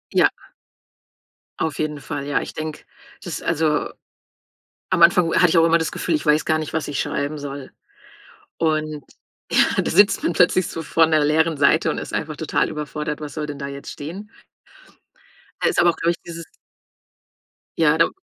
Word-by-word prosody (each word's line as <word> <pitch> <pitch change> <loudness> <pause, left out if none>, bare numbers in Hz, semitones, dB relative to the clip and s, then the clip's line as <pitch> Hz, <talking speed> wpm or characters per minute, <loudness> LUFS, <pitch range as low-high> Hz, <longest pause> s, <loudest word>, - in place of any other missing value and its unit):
Ja - - +5 1.3
auf 160 -2 -2
jeden 150 -1 -2
Fall. 145 -1 -5
Ja, 145 - +1
ich - - -7
denke, 155 -1 -6 0.4
das - - -6
ist - - -13
also 150 -1 0 1.0
am 180 -2 +2
Anfang 170 0 +6
wo - - -2
hatte 180 - +5
ich 165 - +2
auch 165 - +6
immer 165 0 +4
das 160 - -2
Gefühl, 170 - -2
ich 150 - -3
weiß 150 +1 +3
gar 155 0 +1
nicht, 155 - -5
was 160 -3 -2
ich 145 - -3
schreiben 145 +1 -3
soll, 140 -1 -7 0.9
und, 155 -2 -1 0.5
ja, - - +3
da - - -2
sitzt 200 +4 +4
man 170 - +1
plötzlich 180 +1 +3
so 165 - -5
vor 165 +1 +3
'ner 155 -2 +2
leeren 160 +1 +2
Seite 140 0 +3
und - - -3
ist - - -8
einfach - - -3
total - - 0
überfordert, 150 0 -5
was 150 0 -7
soll 155 -1 -3
denn 145 -1 -7
da 140 - -4
jetzt 140 0 -8
stehen. 185 +9 -8 1.3
Da 475 - +3
ist - - 0
aber 175 - +5
auch, - - 0
glaube 170 +1 +1
ich, 170 - -4
dieses 170 -1 -8 1.3
Ja, 160 -1 +4
da 165 - +4
155 Hz, 190 wpm, -21 LUFS, 150-165 Hz, 1.3 s, Anfang